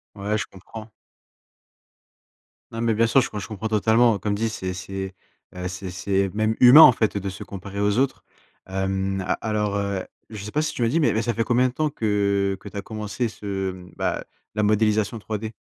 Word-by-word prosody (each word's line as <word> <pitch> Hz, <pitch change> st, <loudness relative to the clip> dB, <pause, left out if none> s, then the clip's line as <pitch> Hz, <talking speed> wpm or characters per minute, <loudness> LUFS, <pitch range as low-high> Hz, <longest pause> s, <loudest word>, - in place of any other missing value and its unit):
Ouais, 105 Hz, +2 st, -1 dB
je -, -, -2 dB
comprends. 110 Hz, +4 st, -11 dB, 1.8 s
Non, 115 Hz, 0 st, -5 dB
mais 115 Hz, -2 st, +1 dB
bien 115 Hz, +1 st, +3 dB
sûr, 135 Hz, +3 st, +5 dB
je -, -, -3 dB
com 105 Hz, -, -5 dB
je 100 Hz, -, -6 dB
comprends 110 Hz, 0 st, -4 dB
totalement. 110 Hz, +1 st, +3 dB
Comme 105 Hz, 0 st, -2 dB
dit, 110 Hz, +2 st, 0 dB
c'est 95 Hz, -3 st, -4 dB
c'est, 95 Hz, +1 st, -6 dB, 0.4 s
heu, 90 Hz, 0 st, -4 dB
c'est 90 Hz, 0 st, -6 dB
c’est 95 Hz, +1 st, 0 dB
même 110 Hz, +1 st, +1 dB
humain, 130 Hz, +5 st, +10 dB
en 130 Hz, -, +11 dB
fait, 110 Hz, -3 st, 0 dB
de 100 Hz, 0 st, -3 dB
se 95 Hz, -, -8 dB
comparer 100 Hz, +1 st, -7 dB
aux 105 Hz, +3 st, +2 dB
autres. 135 Hz, -1 st, 0 dB, 0.4 s
Hem, 95 Hz, 0 st, -1 dB
a 90 Hz, -, 0 dB
alors, 105 Hz, -2 st, -1 dB
heu, 100 Hz, -2 st, -2 dB, 0.3 s
je 105 Hz, -2 st, -7 dB
sais 105 Hz, -, -7 dB
pas 150 Hz, +1 st, +1 dB
si -, -, -2 dB
tu -, -, -5 dB
me 115 Hz, -, +3 dB
l’as -, -, -1 dB
dit, 165 Hz, -, +2 dB
mais 125 Hz, -8 st, +3 dB
mais 110 Hz, -, +1 dB
ça 120 Hz, +1 st, -1 dB
fait 115 Hz, -, +1 dB
combien 125 Hz, +2 st, +3 dB
de 125 Hz, -, -5 dB
temps 155 Hz, +1 st, 0 dB
que 100 Hz, -4 st, 0 dB
que 100 Hz, -, -12 dB
tu -, -, -17 dB
as -, -, -2 dB
commencé 110 Hz, +3 st, -3 dB
ce 100 Hz, -3 st, -4 dB
mmh, 90 Hz, -1 st, -12 dB
bah, -, -, -2 dB, 0.3 s
la 105 Hz, -, +1 dB
modélisation 110 Hz, +1 st, +2 dB
3D? 110 Hz, +1 st, -5 dB
105 Hz, 220 wpm, -24 LUFS, 95-115 Hz, 1.8 s, en